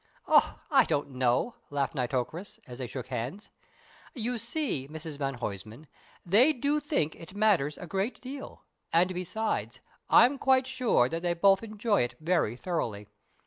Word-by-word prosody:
"Oh, - - +4
I - - +6
don't 145 -1 -1
know," 130 - 0
laughed 140 -1 -1
Nitocris, 135 +7 -3
as 125 0 -10
they 125 - -4
shook 125 +1 -6
hands. 130 - -5 0.6
"You 240 0 -2
see, 235 - -2
Mrs 155 -1 -8
van 135 -1 -2
Huysman, 110 +4 -6 0.4
they 230 - +5
do 285 +3 0
think 280 - -1
it 180 +3 -12
matters 195 -9 +2
a - - -7
great 195 +6 -2
deal, 270 +2 -9 0.3
and, 180 +3 +3
besides, 185 +5 -3 0.3
I'm 265 +3 +6
quite 260 -1 +3
sure 255 - +2
that 165 +4 -4
they 175 -1 0
both 195 +2 +4
enjoy 215 -1 0
it 120 +1 -2
very 160 -8 +1
thoroughly. 115 - -3
175 Hz, 155 wpm, -29 LUFS, 135-225 Hz, 0.6 s, I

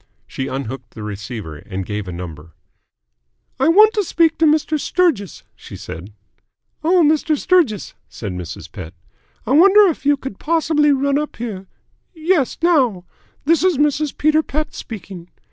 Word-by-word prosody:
She 135 - -5
unhooked 130 -2 -6
the 110 - -7
receiver, 105 -5 -6
and 95 +3 -6
gave 105 0 -4
a - - -5
number. 85 -3 -9 1.0
"I 270 - +3
want 425 +6 +6
to 420 - +1
speak 330 -2 +1
to 325 - +4
Mr. 310 0 +1
Sturgis," 315 - 0
she - - -11
said. 90 +6 -9 0.7
"Oh, 350 +2 +4
Mr. 310 0 +2
Sturgis," 310 - +1 0.2
said 105 -4 -6
Mrs. 90 -2 -8
Pett. 80 +4 -9 0.5
"I 230 - -3
wonder 385 +8 +7
if 305 - -10
you 290 0 +3
could 265 -7 -8
possibly 305 -2 +2
run 280 +1 +1
up 300 - -5
here 205 -5 -6 0.5
yes, 320 -4 0
now. 255 - +2 0.4
This 330 +2 +3
is 370 -5 +3
Mrs. 295 0 0
Peter 310 +1 +3
Pett 305 0 -4
speaking. 185 -5 -9
275 Hz, 155 wpm, -19 LUFS, -, 1.0 s, wonder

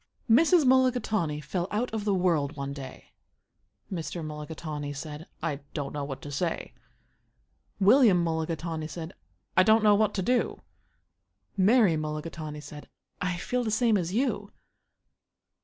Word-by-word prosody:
Mrs. 315 +7 +5
Mulligatawny 240 - +2
fell 175 +4 -3
out 230 +4 -1
of 215 -2 -2
the 205 - +2
world 165 -5 +1
one 140 0 -4
day. 140 -2 -10 0.8
Mr. 165 -1 -4
Mulligatawny 150 -1 -5
said, 150 +3 -7 0.2
"I 155 -4 -1 0.2
don't 145 -3 -3
know 145 -1 -3
what 135 -1 -6
to 145 - -7
say." 165 +4 -2 1.1
William 205 -3 +6
Mulligatawny 160 -1 -2
said, 165 +2 -7 0.4
"I - - +7
don't 220 +3 +5
know 210 -1 +6
what 210 0 +2
to 190 - -1
do." 245 +5 0 0.9
Mary 200 -3 +4
Mulligatawny 155 0 -5
said, 150 0 -11 0.3
"I 180 -1 -1
feel 250 +7 -1
the 225 - -1
same 220 +1 +3
as 180 -3 -1
you." 215 -3 -1
175 Hz, 140 wpm, -28 LUFS, 150-215 Hz, 1.1 s, I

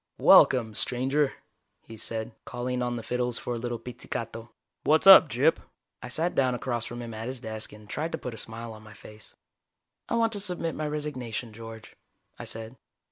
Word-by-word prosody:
"Welcome, 115 -4 +6
stranger," 135 +6 0 0.5
he 115 - -10
said, 110 +1 -3
calling 125 0 -3
on 120 0 -1
the 115 - -5
fiddles 125 0 -1
for 120 - -3
a - - -3
little 120 0 -3
pizzicato. 115 -1 -6 0.3
"What's 155 +4 +3
up, 190 -5 +10
Gyp?" 135 +7 +3 0.4
I - - -6
sat 160 +8 0
down 130 -2 +2
across 120 -2 -2
from 120 0 -6
him 115 -1 -7
at 110 +1 -5
his 130 0 -4
desk 110 -2 -5
and 105 0 -14
tried 155 +9 -3
to - - 0
put 125 - -6
a - - -8
smile 115 +1 -4
on 110 - -12
my 110 -1 -13
face. 105 +1 -13 0.7
"I - - +1
want 230 -1 +2
to 205 - -1
submit 180 -4 -1
my 155 - -3
resignation, 130 -7 -4
George," 115 0 -10 0.4
I - - -6
said. 115 +3 -6
120 Hz, 190 wpm, -27 LUFS, 115-135 Hz, 0.7 s, up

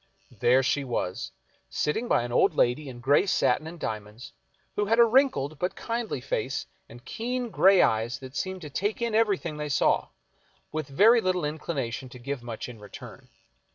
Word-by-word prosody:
There 130 +2 +3
she 140 +2 +1
was, 115 -8 -3 0.4
sitting 150 - -1
by 120 - +2
an 120 - -5
old - - +3
lady 130 +4 +1
in 120 -2 -10
gray 145 +9 +3
satin 155 -5 +2
and 170 +1 -9
diamonds, 110 0 -6 0.4
who 205 - +1
had 225 +3 +2
a 235 - +8
wrinkled 220 - +2
but 180 - -1
kindly 230 - -3
face 135 +1 -2 0.2
and 120 +1 -13
keen 245 +1 -3
gray 195 -1 +6
eyes 110 +2 +1
that 130 0 -11
seemed 185 -1 -3
to 150 -3 -8
take 205 +8 -1
in 235 -2 -1
everything 200 -8 +1
they 150 0 -4
saw, 135 - +2 0.6
with 155 -2 -3
very 220 - +5
little 185 -4 0
inclination 140 -5 -4
to 125 - -11
give 135 +1 -5
much 120 -2 -6
in 120 -3 -10
return. 105 -1 -12
150 Hz, 180 wpm, -27 LUFS, 125-200 Hz, 0.6 s, a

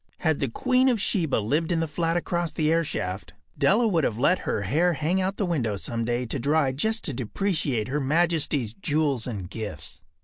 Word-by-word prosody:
Had 160 -4 +1
the 135 - 0
queen 255 - +2
of 240 -4 +1
Sheba 175 -7 +1
lived 150 - 0
in 170 - +2
the 165 - 0
flat 165 +3 0
across 175 -1 -1
the 155 -1 0
airshaft, 100 - -2 0.2
Della 225 +4 +3
would 170 -7 +2
have 110 - 0
let 160 +9 +3
her 100 - 0
hair 165 - +2
hang 165 +5 0
out 190 +2 -1
the 205 - 0
window 130 - 0
some 115 +3 -3
day 120 +1 -1
to 130 +4 -3
dry 140 +2 +2
just 220 - -1
to 145 - -2
depreciate 135 - -1
Her 140 +3 -1
Majesty’s 150 -5 +1
jewels 150 - 0
and 100 -7 -4
gifts. 100 -5 -6
150 Hz, 200 wpm, -26 LUFS, 120-175 Hz, 0.2 s, Della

